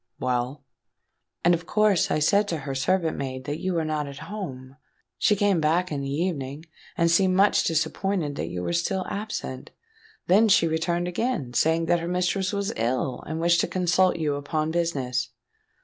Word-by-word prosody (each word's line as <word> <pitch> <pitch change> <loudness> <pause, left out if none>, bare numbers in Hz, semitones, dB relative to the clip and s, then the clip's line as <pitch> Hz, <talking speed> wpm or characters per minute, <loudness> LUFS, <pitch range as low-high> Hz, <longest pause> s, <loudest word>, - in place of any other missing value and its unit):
—well?" 125 +3 -2 0.8
"And 175 - +6
of 170 0 -2
course 210 -4 +3
I - - +1
said 200 +7 +3
to 170 - -2
her 135 - -3
servant 165 +5 0
maid 130 -1 -4
that 145 +2 -3
you 185 -1 -2
were 165 -1 0
not 155 -1 -2
at 140 -1 -8
home. 135 -10 -7 0.4
She 210 - +4
came 200 -4 +2
back 170 +4 +1
in 145 -2 -2
the 135 - -4
evening, 145 -2 -3 0.3
and 170 -1 +3
seemed 185 +2 +3
much 200 +2 +4
disappointed 160 0 -1
that - - -3
you 90 0 -4
were - - -2
still 185 +2 0
absent. 200 -10 -5 0.6
Then 210 +5 +5
she 190 -4 +5
returned 170 +2 -1
again, 180 - -2
saying 160 +4 +2
that 175 +1 +2
her 170 - -4
mistress 180 +2 0
was 200 -1 -2
ill 125 +2 -1
and 160 +1 -3
wished 170 0 +3
to - - -1
consult 180 0 +2
you 155 -3 -1
upon 155 +2 -2
business." 135 -8 -1
165 Hz, 180 wpm, -25 LUFS, 145-185 Hz, 0.8 s, And